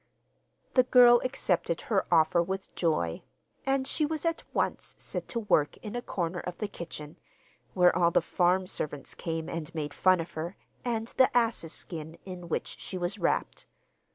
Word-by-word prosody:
The 255 Hz, -, +7 dB
girl 245 Hz, -1 st, +7 dB
accepted 180 Hz, -10 st, 0 dB
her 200 Hz, -4 st, 0 dB
offer 165 Hz, 0 st, +5 dB
with 190 Hz, +2 st, -4 dB
joy, 120 Hz, -, 0 dB, 0.5 s
and 270 Hz, -1 st, +2 dB
she 305 Hz, -, -1 dB
was 310 Hz, +1 st, -1 dB
at 330 Hz, 0 st, 0 dB
once -, -, -1 dB
set -, -, -5 dB
to 235 Hz, -, -2 dB
work 150 Hz, -8 st, +2 dB
in 215 Hz, +1 st, -7 dB
a 245 Hz, -, -2 dB
corner 175 Hz, -5 st, -2 dB
of 180 Hz, 0 st, -6 dB
the 210 Hz, -, -2 dB
kitchen, 165 Hz, -4 st, -8 dB, 0.6 s
where 180 Hz, -2 st, +5 dB
all 170 Hz, -1 st, +4 dB
the -, -, +4 dB
farm 180 Hz, +1 st, +2 dB
servants 150 Hz, -5 st, -4 dB
came 165 Hz, -1 st, -4 dB
and 165 Hz, -1 st, -5 dB
made 150 Hz, -2 st, -3 dB
fun 185 Hz, -1 st, +4 dB
of 165 Hz, -, -5 dB
her, 165 Hz, +4 st, -5 dB, 0.3 s
and 230 Hz, -2 st, -2 dB
the 260 Hz, -, +6 dB
ass's 225 Hz, -9 st, +1 dB
skin 160 Hz, -1 st, -6 dB
in 180 Hz, -2 st, -8 dB
which -, -, -3 dB
she 185 Hz, -, -5 dB
was 175 Hz, +1 st, -2 dB
wrapped. -, -, -1 dB
180 Hz, 175 wpm, -29 LUFS, 165-230 Hz, 0.6 s, The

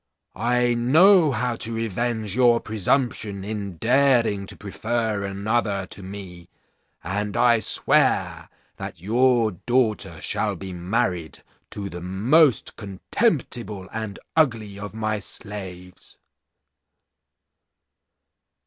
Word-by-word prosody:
I 120 Hz, +3 st, +1 dB
know 155 Hz, +8 st, +5 dB
how 125 Hz, -1 st, -1 dB
to 115 Hz, -, 0 dB
revenge 115 Hz, -1 st, -2 dB
your 120 Hz, -2 st, +4 dB
presumption 110 Hz, -2 st, -1 dB
in 100 Hz, -3 st, -5 dB
daring 120 Hz, -, +2 dB
to -, -, -5 dB
prefer 110 Hz, 0 st, -2 dB
another 100 Hz, 0 st, -1 dB
to 100 Hz, -, -6 dB
me, 95 Hz, -3 st, -9 dB, 0.5 s
and 105 Hz, +5 st, -3 dB
I 120 Hz, -1 st, +4 dB
swear -, -, +2 dB, 0.3 s
that -, -, -7 dB
your 115 Hz, +3 st, +2 dB
daughter 115 Hz, +3 st, 0 dB
shall -, -, -1 dB
be 95 Hz, -1 st, -7 dB
married 90 Hz, -2 st, -2 dB, 0.3 s
to 100 Hz, -1 st, -5 dB
the 90 Hz, -2 st, -8 dB
most 115 Hz, -, +2 dB
contemptible 110 Hz, -, -2 dB
and 110 Hz, -3 st, -5 dB, 0.2 s
ugly 115 Hz, -10 st, +1 dB
of 105 Hz, +1 st, -7 dB
my 110 Hz, -1 st, -1 dB
slaves.' 95 Hz, -4 st, -8 dB
110 Hz, 105 wpm, -23 LUFS, 100-120 Hz, 0.5 s, know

